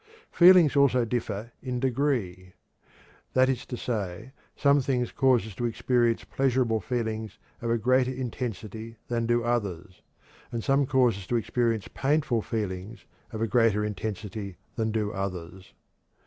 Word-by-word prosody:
Feelings 175 -4 +7
also 130 -4 +4
differ 115 -1 -3
in 125 -2 -3
degree; 120 -9 -1 0.8
that 130 0 +4
is 130 -2 -2
to 125 - -5
say, 105 -1 -4 0.2
some 140 0 +4
things 125 -2 -1
cause 130 -5 +3
us 110 - -8
to 120 - -3
experience 120 0 +1
pleasurable 125 -4 +1
feelings 110 -1 -3 0.2
of 115 - -2
a 115 - +2
greater 130 +3 +2
intensity 115 -3 -5
than 115 -1 0
do 120 0 +2
others, 100 -6 -2 0.5
and 115 -2 -3
some 135 0 +2
cause 125 -6 +3
us 95 - -11
to 120 - 0
experience 115 -2 0
painful 135 -4 0
feelings 105 0 -4 0.3
of 110 0 -3
a - - +1
greater 110 -1 +3
intensity 105 -1 -5 0.2
than 110 0 0
do 105 -2 -1
others. 95 -1 -5
115 Hz, 145 wpm, -27 LUFS, 105-125 Hz, 0.8 s, Feelings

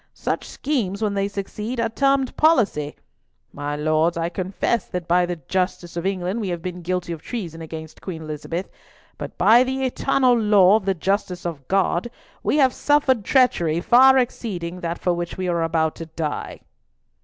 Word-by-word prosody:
Such - - -3
schemes, 225 -8 -2
when 210 -1 0
they 200 0 0
succeed, 210 +4 -5
are 230 - +2
termed 275 +2 +1
policy. 210 - +2 0.6
My 145 +1 -4
Lords, 155 +3 +1
I 165 0 -1
confess 190 +6 -2
that 180 -2 -5
by 175 +1 +3
the 175 - -2
justice 175 +2 -3
of 170 +2 -2
England 190 +3 -2
we 200 - -3
have 170 -2 -4
been 180 -1 -5
guilty 175 0 -2
of 160 - -8
treason 170 -9 -6
against 160 -1 -9
Queen 165 -4 -6
Elizabeth; 155 +4 -5 0.5
but - - -7
by 235 +3 +6
the 265 +1 -2
eternal 260 0 +2
law 210 -4 +5
of 210 - -7
the 195 -1 +1
justice 190 0 -2
of 150 -6 -5
God, 190 +2 +1 0.3
we - - +1
have 265 -3 +4
suffered 285 -6 +2
treachery 175 - +2
far 260 +7 +6
exceeding 185 -8 -2
that 170 0 -3
for 180 - 0
which 175 0 -4
we 185 -1 -2
are 170 -1 0
about 160 -1 +1
to 165 - -7
die." 155 -2 -5
185 Hz, 180 wpm, -22 LUFS, 170-230 Hz, 0.6 s, by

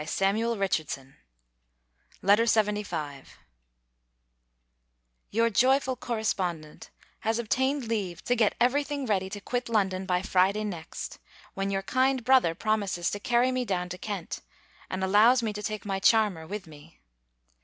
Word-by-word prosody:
LETTER 205 +8 0
LXXV 190 -8 -1 1.3
MY 200 +2 +6
DEAREST 230 +1 +3
LADY, 180 -10 -1 2.1
Your 230 +2 +2
joyful 260 +4 +3
correspondent 185 -10 -3 0.3
has 225 +1 0
obtained 260 +4 0
leave 195 -6 -3
to 245 - +1
get 220 -3 +2
every 255 +5 +3
thing: 285 -1 -4
ready 190 -4 0
to 205 +1 -6
quit 245 +3 -3
London 190 -4 0
by 180 -1 +1
Friday 195 +2 +2
next, 175 -6 -6 0.3
when 195 0 -2
your 195 0 -1
kind 260 +3 +1
brother 250 -10 +4
promises 200 -4 -1
to 205 - -4
carry 240 +4 +2
me 255 0 0
down 180 -5 -2
to 180 +1 -7
Kent, 200 -5 -5 0.5
and 185 0 -3
allows 220 +6 +5
me 215 -2 -1
to 210 - -6
take 215 0 -4
my 195 -1 -2
charmer 200 -6 +3
with 205 +1 -5
me. 145 - -15
210 Hz, 145 wpm, -28 LUFS, 185-235 Hz, 2.1 s, MY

